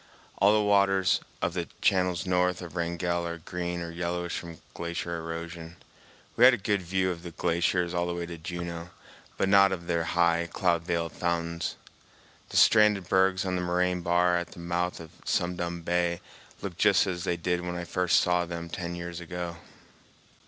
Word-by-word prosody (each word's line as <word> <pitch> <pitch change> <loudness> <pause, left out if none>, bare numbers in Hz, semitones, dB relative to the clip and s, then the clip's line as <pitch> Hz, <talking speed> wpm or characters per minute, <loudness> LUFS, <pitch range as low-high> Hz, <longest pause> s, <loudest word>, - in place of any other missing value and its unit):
All 100 +1 +6
the 105 0 +3
waters 100 -2 +3 0.2
of 85 - 0
the 85 -2 -3
channels 90 -2 +2
north 90 0 +1
of 85 0 -9
Wrangell 85 0 -1
are 85 0 -4
green 85 +1 -4
or 85 - -6
yellowish 85 0 -3
from 85 -2 -7
glacier 85 0 -4
erosion. 85 0 -6 0.6
We 120 - +3
had 125 0 +9
a - - -7
good 100 -1 0
view 95 +1 0
of 85 -1 -6
the 85 - -7
glaciers 85 +1 0
all 85 0 0
the 85 - -2
way 85 0 -3
to 85 -1 -8
Juneau, 85 0 -5 0.5
but 95 - +1
not 100 0 +6
of 85 -2 -4
their 85 -1 0
high, 85 0 +2
cloud 85 -3 +1
veiled 85 -1 -1
fountains. 85 0 -2 0.7
The - - -2
stranded 105 -4 +5
bergs 95 +1 +3
on 90 -1 -1
the 90 - -1
moraine 90 0 0
bar 90 0 +3
at 85 - -4
the - - -12
mouth 85 +1 -2
of 80 -2 -10
Sum 90 +1 0
Dum 85 -1 -4
Bay 85 0 0 0.4
looked 95 -3 -6
just 105 -3 +5
as 90 -3 -3
they 85 - 0
did 90 +1 -1
when 90 0 -4
I 90 - -3
first 90 0 +2
saw 90 0 +2
them 85 -1 -6
ten 85 0 -4
years 85 0 -6
ago. 85 0 -5
85 Hz, 190 wpm, -28 LUFS, 85-90 Hz, 0.7 s, had